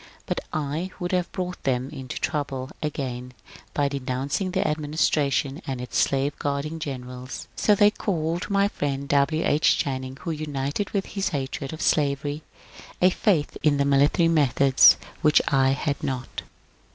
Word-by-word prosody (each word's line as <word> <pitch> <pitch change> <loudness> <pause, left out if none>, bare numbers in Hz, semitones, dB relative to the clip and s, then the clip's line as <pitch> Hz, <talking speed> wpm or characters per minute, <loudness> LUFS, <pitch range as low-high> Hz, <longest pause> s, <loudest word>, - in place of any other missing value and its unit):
But - - -2
I 155 +4 -2
would 175 -1 -3
have 180 -2 0
brought 180 -1 -4
them 130 0 -1
into 135 -4 -6
trouble 140 -3 -2
again 125 -4 -4 0.4
by 145 -1 +2
denouncing 140 +6 -2
the 185 +1 0
administration 150 -1 0
and 130 -2 -3
its 125 - -7
slave 140 +1 +1
guarding 145 +3 -2
generals. 125 -3 -6
So 210 - +3
they 205 +1 +5
called 170 -4 -2
my 200 0 +3
friend 140 -7 -3
W. 145 +3 +2
H. 150 +2 +3
Channing, 130 -1 -3
who 170 - -3
united 150 +3 -3
with 195 -2 -1
his 195 -1 -2
hatred 135 -2 -4
of 160 - -5
slavery 145 0 +1 0.6
a 185 +1 +5
faith 180 -7 +1
in 145 -2 +3
military 140 +4 +4
methods 140 -4 +5 0.2
which 150 -2 +5
I 135 -1 +3
had 145 +1 -2
not. 130 -1 -4
145 Hz, 150 wpm, -25 LUFS, 135-160 Hz, 0.6 s, they